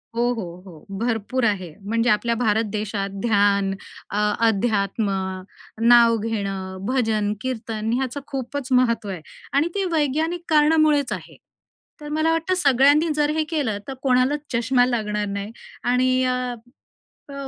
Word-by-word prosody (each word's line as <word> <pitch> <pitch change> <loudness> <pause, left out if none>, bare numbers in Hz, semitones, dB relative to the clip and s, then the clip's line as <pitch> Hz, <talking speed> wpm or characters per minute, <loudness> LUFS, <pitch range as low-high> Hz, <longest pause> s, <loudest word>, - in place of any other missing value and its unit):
हो, 235 - 0
हो, 225 -6 -4 0.2
हो. 165 -5 -13
भरपूर 235 +2 -1
आहे. 185 -7 -1
म्हणजे 230 +4 0
आपल्या 230 +2 +2
भारत 220 -1 +1
देशात 205 -2 -3
ध्यान, 200 -3 +2 0.4
अ, 205 - -3 0.3
अध्यात्म, 205 -1 0 0.7
नाव 235 -1 +6
घेणं, 195 -4 -3
भजन, 220 -5 0
कीर्तन 225 -3 -3
ह्याचं 260 +2 -2
खूपच 270 -1 -5
महत्त्व 230 -5 +2
आहे 180 -4 -5 0.3
आणि 290 +4 +3
ते 400 - 0
वैज्ञानिक 320 +3 0
कारणामुळेच 300 -2 +3
आहे. - - -9 0.6
तर 295 - -7
मला 320 +1 +2
वाटतं, 330 +3 0
सगळ्यांनी 290 0 +4
जर 295 0 +2
हे 315 - +2
केलं, 275 -10 -1
तर 270 - -4
कोणालाच 260 +2 +2
चष्मा 245 +1 +3
लागणार 210 -4 -1
नाही 200 +2 -4 0.3
आणि 255 +1 +2
अ, 250 -1 -1 0.8
प - - -9
240 Hz, 135 wpm, -22 LUFS, 210-275 Hz, 0.8 s, नाव